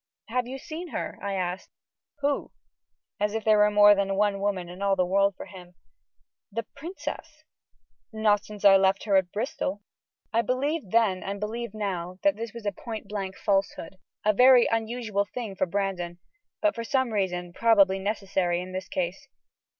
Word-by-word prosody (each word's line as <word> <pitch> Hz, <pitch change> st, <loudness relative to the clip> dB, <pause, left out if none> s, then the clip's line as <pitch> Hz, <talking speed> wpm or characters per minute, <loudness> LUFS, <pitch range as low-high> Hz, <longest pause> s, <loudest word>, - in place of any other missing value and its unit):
"Have 245 Hz, +1 st, -1 dB
you 265 Hz, +2 st, -5 dB
seen 330 Hz, +5 st, -7 dB
her?" -, -, -5 dB
I 200 Hz, -1 st, -2 dB
asked. 180 Hz, 0 st, -3 dB, 0.5 s
"Who?" 285 Hz, 0 st, 0 dB, 0.7 s
As 210 Hz, +1 st, 0 dB
if 225 Hz, -, -2 dB
there 215 Hz, -1 st, +4 dB
were 210 Hz, 0 st, +6 dB
more 205 Hz, 0 st, +7 dB
than 195 Hz, -1 st, 0 dB
one 200 Hz, 0 st, +1 dB
woman 195 Hz, -3 st, -1 dB
in 180 Hz, +2 st, -10 dB
all 200 Hz, -1 st, +2 dB
the 185 Hz, -1 st, +2 dB
world 195 Hz, +1 st, +2 dB
for -, -, -7 dB
him. 180 Hz, -2 st, -13 dB, 0.8 s
"The 230 Hz, +3 st, -3 dB
princess." 310 Hz, -, -8 dB, 0.7 s
"Not 215 Hz, -2 st, +2 dB
since 210 Hz, -1 st, -8 dB
I 195 Hz, -1 st, +9 dB
left 190 Hz, 0 st, +2 dB
her 205 Hz, -2 st, +1 dB
at 185 Hz, -2 st, +3 dB
Bristol." 205 Hz, -3 st, -3 dB, 0.5 s
I 230 Hz, -, +4 dB
believed 270 Hz, -, -1 dB
then, 210 Hz, -4 st, +2 dB
and 200 Hz, +1 st, -4 dB
believe 220 Hz, +1 st, -4 dB
now, 185 Hz, -4 st, -3 dB
that 200 Hz, 0 st, +4 dB
this 225 Hz, +1 st, -5 dB
was 235 Hz, -1 st, -10 dB
a 205 Hz, -, +1 dB
point 220 Hz, +3 st, -7 dB
blank 195 Hz, -2 st, -4 dB
falsehood 195 Hz, -2 st, -1 dB, 0.3 s
a 215 Hz, -, +4 dB
very 250 Hz, +2 st, +7 dB
unusual 225 Hz, -2 st, -1 dB
thing 225 Hz, -6 st, -5 dB
for 185 Hz, -, 0 dB
Brandon 180 Hz, -2 st, -2 dB, 0.5 s
but 315 Hz, -1 st, +4 dB
for 230 Hz, -, -5 dB
some 260 Hz, -1 st, 0 dB
reason 180 Hz, -3 st, -2 dB
probably 200 Hz, -3 st, +4 dB
necessary 190 Hz, -3 st, -1 dB
in 180 Hz, +1 st, -6 dB
this 185 Hz, 0 st, -5 dB
case. 180 Hz, +1 st, -3 dB
205 Hz, 175 wpm, -27 LUFS, 190-230 Hz, 0.8 s, I